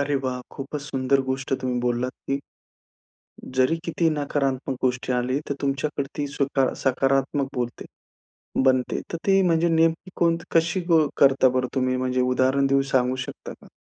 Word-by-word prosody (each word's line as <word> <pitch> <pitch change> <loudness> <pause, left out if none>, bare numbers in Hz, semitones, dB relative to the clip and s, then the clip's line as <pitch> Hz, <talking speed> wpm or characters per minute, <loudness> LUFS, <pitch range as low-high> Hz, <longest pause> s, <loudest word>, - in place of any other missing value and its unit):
अरे 140 0 0
वाह! 125 -1 -2
खूपच 140 +2 -6
सुंदर 135 -1 0
गोष्ट 130 0 -3
तुम्ही 125 -1 -1
बोललात 125 +1 -1 0.2
की 140 - +1 1.2
जरी 130 +6 +3
किती 170 0 +1
नकारात्मक 140 -3 -1
गोष्ट 125 0 -1
आली, 125 +2 0
तर - - +1
तुमच्याकडे 140 +1 -1
ती 145 -1 -1
सुद्धा 135 -2 +1
सकारात्मक 135 +1 +1
बोलते 120 -1 -3 0.8
बनते. 130 -1 +1
तर - - -1
ती 195 0 +5
म्हणजे 170 -2 +2
नेमकी 165 +3 +1
कोणत 170 -1 +1
कशी 175 +2 +2
ब 160 -3 +5
करता 135 -1 +5
बरं 130 0 0
तुम्ही? 130 -1 +1
म्हणजे 130 0 0
उदाहरण 130 +2 +2
देऊन 135 0 +3
सांगू 130 0 +2
शकता - - -8
का? - - -18
135 Hz, 155 wpm, -24 LUFS, 130-150 Hz, 1.2 s, ती